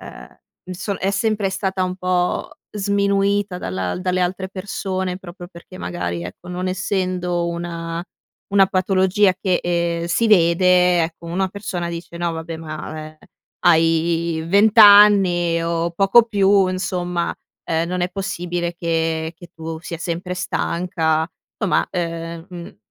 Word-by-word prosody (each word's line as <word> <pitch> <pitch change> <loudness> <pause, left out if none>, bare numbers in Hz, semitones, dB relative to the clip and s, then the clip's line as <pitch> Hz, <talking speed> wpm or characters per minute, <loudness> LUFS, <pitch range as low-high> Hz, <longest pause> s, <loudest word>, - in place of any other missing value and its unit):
ehm - - -12 0.3
m 185 - -10
so 195 +3 -3
è 195 - -1
sempre 205 -1 0
stata 190 -1 -2
un 185 0 -2
po' 180 +3 -1 0.2
sminuita 200 -1 0
dalla 95 - -3
dalle 185 0 -1
altre 185 +1 -1
persone 190 -1 -4
proprio 175 -1 -10
perché 175 +1 -13
magari, 85 - -4
ecco, 90 - -10
non 180 +1 -3
essendo 185 -2 -1
una 170 -1 -4 0.5
una 195 -1 +6
patologia 190 +1 +2
che, 185 -2 +1
ehm, 170 -1 -1
si 220 +7 +1
vede, 180 -1 +4
ecco, 165 +1 -5
una 185 +3 -1
persona 190 -3 -4
dice: 170 0 -7
"No 170 0 -1
vabbè 160 0 -6
ma, 155 -1 -7
ehm, 155 - -18 0.5
hai 165 0 +2
20 205 +5 +4
anni 195 -5 +7
o 170 0 -1
poco 195 +6 +5
più 200 -2 +3
insomma, 180 -2 -2 0.3
ehm, 165 +1 -1
non 180 0 -2
è 175 - 0
possibile 175 -2 -3
che 165 -1 -1
che 175 +1 -13
tu 160 0 -7
sia 170 -1 -6
sempre 175 +2 -4
stanca". 170 -3 -1 0.3
Insomma 190 -8 +1
ehm, 165 -1 -4
mhmm, 175 -1 -10
180 Hz, 140 wpm, -20 LUFS, 170-190 Hz, 0.5 s, anni